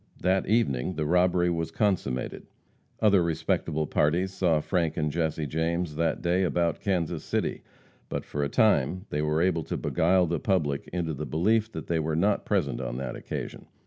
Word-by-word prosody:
That 95 +1 +1
evening 95 - +1
the 75 - -1
robbery 90 +1 +3
was 85 -1 -2
consummated. 85 - -1 0.5
Other 100 -4 +5
respectable 80 -1 0
parties 85 +6 +1
saw 85 -5 +2
Frank 85 0 -1
and 75 -2 0
Jesse 80 -1 -1
James 80 +2 -1
that 80 +1 0
day 90 +2 +2
about 85 -3 +1
Kansas 90 -5 -1
City, - - -2 0.5
but - - -3
for 75 - -3
a 70 - -1
time 95 -1 +2
they 75 - 0
were 75 +2 +1
able 90 -3 +1
to - - -3
beguile 90 +2 +2
the 85 -1 -1
public 75 -8 0
into 85 -3 -2
the 75 +1 -5
belief 110 +7 +1
that - - -5
they 85 -1 0
were 80 0 -1
not 100 +5 +1
present 70 - 0
on - - -4
that 65 - -4
occasion. - - -6
85 Hz, 175 wpm, -27 LUFS, 75-95 Hz, 0.5 s, Other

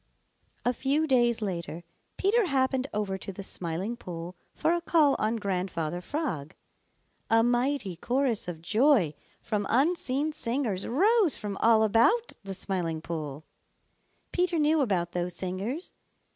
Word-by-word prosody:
A 245 - +3
few 280 +5 +1
days 240 -5 +2
later 170 -3 -4 0.3
Peter 420 +3 +3
happened 265 -1 +1
over 200 -2 -2
to 195 - -6
the 195 +1 -8
Smiling 185 +5 -2
Pool 175 -5 -7 0.2
for 320 +2 +2
a 345 - 0
call 315 -4 +4
on 220 +2 +1
Grandfather 180 -5 -2
Frog. 180 - -3 0.7
A 225 0 +5
mighty 245 - 0
chorus 245 +1 0
of 165 -2 -6
joy 215 - +3 0.3
from 210 -2 -1
unseen 290 +1 +1
singers 230 -8 -2
rose 390 - +3
from 205 -2 -5
all 225 -1 +5
about 235 - +3
the 195 -1 -6
Smiling 180 -4 -2
Pool. 155 -2 -5 0.9
Peter 355 -1 +1
knew 310 0 +3
about 180 -9 0
those 175 0 -2
singers. 195 - -4
225 Hz, 135 wpm, -28 LUFS, 180-280 Hz, 0.9 s, A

